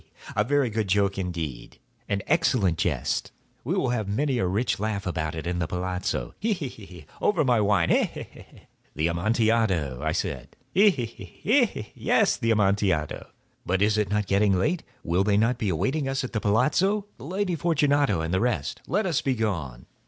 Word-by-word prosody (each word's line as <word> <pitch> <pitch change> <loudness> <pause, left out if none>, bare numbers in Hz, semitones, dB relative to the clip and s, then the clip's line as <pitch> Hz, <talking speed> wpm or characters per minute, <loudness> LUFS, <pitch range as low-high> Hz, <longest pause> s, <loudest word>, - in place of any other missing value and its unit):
he!—a 105 - +1
very 135 0 +1
good 110 -1 -1
joke 100 0 +1
indeed—an 90 - -5
excellent 125 - +2
jest. - - -1 0.3
We - - -1
will 130 - +1
have 115 -5 -1
many 130 +5 0
a 95 - +1
rich 105 +6 0
laugh 105 -2 -2
about 80 -3 -2
it 80 - -5
at 90 0 -2
the 85 - -1
palazzo—he! 90 - -2
he! 170 -8 -4
he!—over 95 - -3
our 120 -4 +3
wine—he! 100 -4 +3
he! - - -7
he!" - - -15 0.5
"The 75 +2 +1
Amontillado!" 100 - +1
I - - 0
said. - - -4 0.2
"He! 205 +3 +6
he! 135 -11 -1
he!—he! 100 -6 -12
he! 250 +3 +3 0.2
he!—yes, - - +1
the 115 - -1
Amontillado. 100 -7 +1 0.4
But 95 +2 +1
is 105 +1 +3
it 105 -3 0
not 105 0 0
getting 100 0 +3
late? 155 - 0 0.2
Will 90 +3 +1
not 110 +4 +2
they - - -2
be - - +1
awaiting 130 - 0
us 135 0 -1
at 130 - -6
the 110 - -1
palazzo, 165 - +2
the 120 - -9
Lady 185 +2 -1
Fortunato 145 - +2
and 80 +2 -3
the 95 - +2
rest? 115 - -1
Let 205 +4 0
us 170 -6 +1
be 135 -2 0
gone." 85 - -3
105 Hz, 180 wpm, -26 LUFS, 90-135 Hz, 0.5 s, He